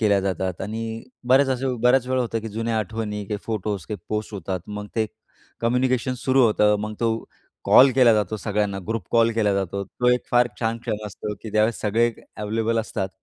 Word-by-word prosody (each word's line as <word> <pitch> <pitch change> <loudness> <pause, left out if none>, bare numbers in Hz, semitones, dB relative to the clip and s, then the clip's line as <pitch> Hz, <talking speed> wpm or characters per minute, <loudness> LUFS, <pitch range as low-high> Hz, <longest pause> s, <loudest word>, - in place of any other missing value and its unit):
केल्या 105 -3 +4
जातात 95 -1 -2
आणि 110 +3 -4 0.5
बऱ्याच 135 +1 +5
अशा 130 +1 0 0.4
वेळा 130 0 +1
होतं 115 -2 -1
की 115 - -6
जुन्या 115 +1 -1
आठवणी, 105 0 -3
काही 105 0 -3
फोटो 105 -2 -2
काही 105 - -3
पोस्ट 105 0 -3
होतात. 95 -1 -3
मग 105 0 -6
ते 110 -1 +2 0.5
कम्युनिकेशन 125 +1 +1
सुरू 130 0 +4
होतं, 105 -1 +4
मग 105 0 -4
तो 115 -1 +2 0.5
कॉल 135 +1 +7
केला 125 -3 +6
जातो, 105 0 0
सगळ्यांना 105 -2 -1
ग्रुप 115 -5 -2
कॉल 115 0 +4
केला 110 -3 +2
जातो. 100 0 -2
तो 125 +6 -1
एक 125 - 0
फार 120 0 +4
छान 115 0 0
क्षण 105 -2 -4
असतो, 105 +2 -5
की 110 - -6
ज्यावेळेस 110 +2 +1
सगळे 115 +3 +2 0.2
अव्हेलेबल 110 +2 -1
असतात, 95 -3 -2
110 Hz, 185 wpm, -23 LUFS, 105-115 Hz, 0.5 s, कॉल